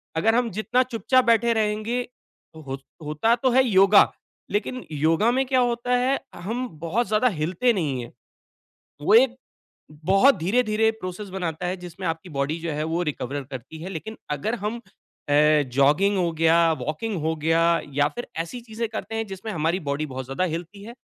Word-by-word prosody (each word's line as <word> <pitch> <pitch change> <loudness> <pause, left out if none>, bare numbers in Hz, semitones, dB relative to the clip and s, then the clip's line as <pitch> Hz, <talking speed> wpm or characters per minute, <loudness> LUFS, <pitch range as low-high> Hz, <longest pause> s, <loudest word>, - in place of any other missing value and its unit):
अगर 225 +8 +2
हम 245 -1 +2
जितना 215 +6 +1
चुपचाप 255 +1 +1
बैठे 235 0 +4
रहेंगे 215 +2 0 0.6
हो 140 -4 -6 0.3
होता 155 +11 +2
तो 255 +2 +1
है 260 +2 +5
योगा, 195 -1 +6 0.4
लेकिन 240 +5 -2
योगा 160 +9 +2
में 265 +2 +1
क्या 260 0 +2
होता 245 0 0
है, 260 +2 +1 0.2
हम 230 +9 -3
बहुत 185 +9 -1
ज़्यादा 215 +4 +2
हिलते 185 +10 +1
नहीं 145 -9 -1
हैं। 120 - -10 0.9
वो 200 - +4
एक 250 +2 +5 0.7
बहुत 195 - +5
धीरे-धीरे 215 +4 +2
प्रोसेस 185 +3 -6
बनाता 180 -3 -4
है 185 +1 -2
जिसमें 180 +1 -7
आपकी 165 +2 -4
बॉडी 145 +2 -2
जो 165 0 -3
है, 150 +1 -2
वो 165 +2 -1
रिकवर 145 -3 -3
करती 130 +4 -8
है। 185 - -5
लेकिन 195 +5 -7
अगर 150 - -1
हम 220 +3 -2 0.5
अ, - - 0 0.4
जॉगिंग 150 +9 +3
हो 175 -2 +1
गया, 165 +1 +4
वॉकिंग 200 +9 -3
हो 160 +1 0
गया, 165 +2 +2
या 145 +1 +3
फिर 240 - -5
ऐसी 170 +9 -4
चीज़ें 230 0 -4
करते 225 0 -5
हैं 225 0 -1
जिसमें 195 +3 -6
हमारी 165 0 0
बॉडी 140 +2 -1
बहुत 130 -2 -6
ज़्यादा 135 +8 -2
हिलती 180 +4 -4
है, 230 +3 -9
190 Hz, 175 wpm, -24 LUFS, 160-230 Hz, 0.9 s, योगा